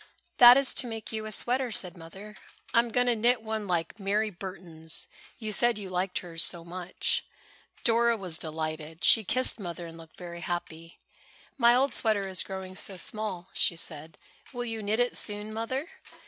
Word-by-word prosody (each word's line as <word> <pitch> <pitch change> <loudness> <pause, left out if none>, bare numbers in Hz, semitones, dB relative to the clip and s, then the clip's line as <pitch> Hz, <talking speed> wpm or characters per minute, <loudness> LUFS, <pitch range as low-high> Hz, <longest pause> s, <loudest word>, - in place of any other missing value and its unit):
"That 245 +1 +10
is 275 -1 +2
to 250 - -1
make 225 -2 -6
you 220 -1 -4
a - - -6
sweater," 250 +4 +1
said 180 -5 0
Mother. 195 +5 -11 0.4
"I - - +6
am 235 0 +1
going 245 +2 +1
to 245 -1 +3
knit 235 +1 +2
one 220 -2 -4
like 175 +3 -2
Mary 210 +2 0
Burton's. 170 -4 -2 0.3
You 215 -2 -4
said 240 +2 +3
you 195 -3 -6
liked 180 +1 -1
hers 165 -1 +2
so 170 -2 +2
much." 180 +1 -2 0.6
Dora 235 0 +3
was 180 -5 -3
delighted. 155 0 -5
She 225 - +7
kissed 255 +3 +1
Mother 175 -2 -6
and 165 0 -11
looked 165 -1 -14
very 170 -1 -8
happy. 165 -1 -6 0.6
"My 240 -2 +5
old 270 +2 +2
sweater 210 -3 +1
is 190 -1 +5
growing 190 -1 -6
so 195 0 -1
small," 190 -2 -4
she 170 - +2
said. 160 -1 -4 0.3
"Will 245 -2 -4
you 225 -2 -4
knit 210 +2 0
it 245 0 +1
soon, 210 0 -1
Mother?" 260 +7 -3
200 Hz, 185 wpm, -28 LUFS, 175-230 Hz, 0.6 s, That